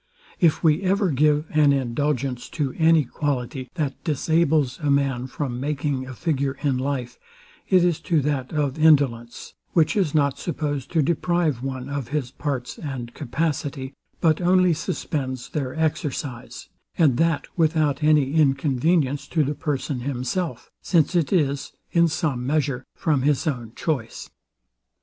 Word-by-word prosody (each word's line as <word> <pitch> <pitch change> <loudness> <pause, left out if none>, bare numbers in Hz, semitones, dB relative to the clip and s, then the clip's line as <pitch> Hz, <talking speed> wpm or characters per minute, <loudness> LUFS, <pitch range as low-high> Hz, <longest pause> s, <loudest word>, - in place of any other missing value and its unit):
If 165 -1 +3
we 160 +2 +4
ever 195 -1 +1
give 150 +2 +2
an 150 -2 +4
indulgence 130 -1 -1
to 140 -4 -1
any 160 -2 +5
quality, 130 -1 -3
that 145 -6 -3
disables 155 -3 +1
a 150 -3 -1
man 135 -3 +1
from 130 -2 -4
making 140 -1 -2
a 130 - -8
figure 140 -3 -1
in 135 -3 +1
life, 130 -3 -3 0.5
it 185 -2 +5
is 175 -3 +2
to 170 -4 +1
that 140 -2 -2
of 145 -2 -1
indolence, 135 -7 +2 0.2
which 165 +4 +3
is 180 -8 +1
not 140 -2 +2
supposed 145 -6 -3
to 160 -3 +3
deprive 170 -3 0
one 130 -1 -4
of 140 -3 -4
his 140 -3 -2
parts 135 -5 -4
and 130 -5 -6
capacity, 140 -1 -3 0.3
but 160 0 +2
only 180 0 +4
suspends 130 -5 -3
their 135 -4 -3
exercise; 145 -5 -3 0.3
and 145 -8 +4
that 165 -2 +1
without 155 -4 +1
any 150 -2 +3
inconvenience 145 0 +2
to 155 0 +1
the 145 +1 -1
person 145 -2 -3
himself, 140 +7 -3
since 170 -2 +2
it 165 -5 +1
is, 140 -7 0 0.2
in 170 -1 +4
some 150 -5 -1
measure, 140 -3 0
from 150 -5 +1
his 145 0 +1
own 120 -7 -3
choice. 130 -9 -3
145 Hz, 145 wpm, -23 LUFS, 130-160 Hz, 0.5 s, any